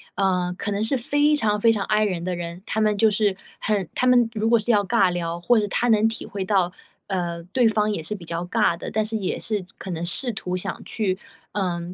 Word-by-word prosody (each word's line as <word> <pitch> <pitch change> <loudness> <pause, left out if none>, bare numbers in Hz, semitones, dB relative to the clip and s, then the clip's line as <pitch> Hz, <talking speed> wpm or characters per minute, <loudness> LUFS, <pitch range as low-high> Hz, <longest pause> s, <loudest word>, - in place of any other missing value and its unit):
呃， 180 -2 +1
可 205 - -3
能 200 +1 -1
是 255 +4 +1
非 290 +4 +2
常 210 -8 +1
非 230 - +6
常 210 -3 -1
I 215 0 +2
人 180 -5 -1
的 185 -1 -1
人， 170 +1 -6
他 220 - -1
们 210 -1 +2
就 220 0 +5
是 205 -2 +1 0.2
很 205 -5 0
他 - - +1
们 245 -2 +5
如 220 0 0
果 235 -1 +5
是 215 - -6
要 210 -3 +4
尬 200 -3 +3
聊， 170 -1 -3
或 240 +7 +3
者 - - 0
他 245 - 0
能 220 -1 +4
体 225 - -6
会 200 -1 -4
到， 185 -2 +1 0.3
呃， 175 -3 -2
对 245 0 +4
方 215 -1 +2
也 205 - -2
是 160 +7 -4
比 180 - -10
较 170 +1 -3
尬 170 -1 +1
的， - - -6
但 215 0 0
是 220 +1 -2
也 195 -4 -2
是 210 -4 -2
可 195 - -8
能 170 0 -3
试 240 +8 +1
图 185 -4 -4
想 185 +1 -4
去， 195 -4 -1 0.3
嗯， 175 -3 -2
205 Hz, 260 characters per minute, -23 LUFS, 180-220 Hz, 0.3 s, 非